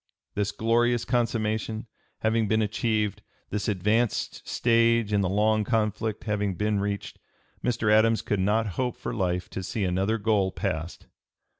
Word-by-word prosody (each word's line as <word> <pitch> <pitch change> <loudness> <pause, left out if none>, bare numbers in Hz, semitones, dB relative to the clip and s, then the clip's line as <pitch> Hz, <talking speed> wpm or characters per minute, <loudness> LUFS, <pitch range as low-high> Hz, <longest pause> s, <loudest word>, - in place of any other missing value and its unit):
This 100 -1 -1
glorious 120 +1 +1
consummation 110 -2 -1 0.4
having 110 0 +2
been 110 +2 +2
achieved, 110 -1 -1 0.3
this 105 -1 -2
advanced 105 +3 0
stage 115 -2 +3
in 100 - +3
the 95 - 0
long 105 +2 +2
conflict 110 -1 -1
having 105 -3 -1
been 105 +2 0
reached, 100 0 -3 0.4
Mr. 115 -3 +2
Adams 110 +1 +4
could 105 - -1
not 105 +4 +2 0.2
hope 125 -2 -2
for - - -4
life 90 -3 -1
to - - -4
see 100 +3 -3
another 95 +4 +1
goal 100 -3 +1
passed. 80 0 -4
110 Hz, 145 wpm, -26 LUFS, 100-115 Hz, 0.4 s, Adams